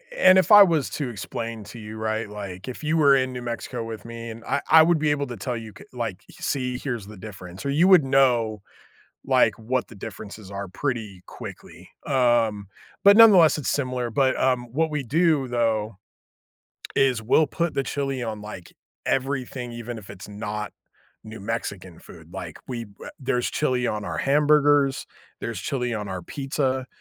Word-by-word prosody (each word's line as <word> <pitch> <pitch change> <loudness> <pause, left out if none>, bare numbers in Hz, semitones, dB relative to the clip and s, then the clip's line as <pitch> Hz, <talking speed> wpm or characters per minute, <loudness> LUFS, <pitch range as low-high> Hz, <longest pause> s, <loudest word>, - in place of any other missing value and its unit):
and 185 - +6
if 185 0 +3
I 205 -1 +11
was 160 -7 +1
to 140 -5 -3
explain 115 0 -5
to 120 - -10
you, 110 0 -8
right, 110 0 -2
like, 100 -1 -8
if 130 +4 -7
you 155 +2 +1
were 140 -3 +6
in 130 -1 0
New 125 - -5
Mexico 120 0 -4
with 115 0 -7
me, 115 0 -7
and 115 +1 -9
I - - 0
I 160 0 +9
would 170 0 +3
be 150 -1 +2
able 140 -1 -1
to 120 -3 -7
tell 120 +5 -3
you, 110 -2 -9
c - - -12
like, 115 -7 -4
"See, 125 -2 -2
here's 120 -7 -4
the 105 -2 -11
difference." 95 0 -10
Or - - 0
you 160 +6 +4
would 185 -6 +7
know, 120 -6 +2 0.6
like, - - +3
what 125 +3 -2
the 115 - -13
differences 105 -1 -9
are 100 -1 -5
pretty 110 -5 -4
quickly, - - -10 0.2
um, 115 -6 +2 0.3
but 200 +1 +7
nonetheless, 185 -10 +7
it's 145 - -2
similar. 125 -3 -1
But, 130 +2 +2
um, 125 -2 +1
what 160 +2 +1
we 150 -2 -2
do, 150 0 +2
though, 115 -3 0 1.0
is 130 -4 +3
we'll 150 +7 +4
put 170 +1 -2
the 140 - +1
chili 135 -1 -3
on 110 -2 -4
like 105 -4 -9 0.3
everything, 130 -2 -2
even 120 0 -6
if 100 - -12
it's 100 0 -10
not 105 +1 -5 0.5
New 110 -1 -9
Mexican 100 -5 -5
food. - - -15
Like, - - -7
we 120 -2 -4
w 100 -1 -12
there's 125 -2 -1
chili 125 -4 0
on 105 -1 -2
our - - -4
hamburgers, 145 -1 +3 0.3
there's - - -4
chili 125 -3 -2
on 105 -1 -4
our 95 -2 -5
pizza, 135 - -2
125 Hz, 185 wpm, -24 LUFS, 110-140 Hz, 1.0 s, I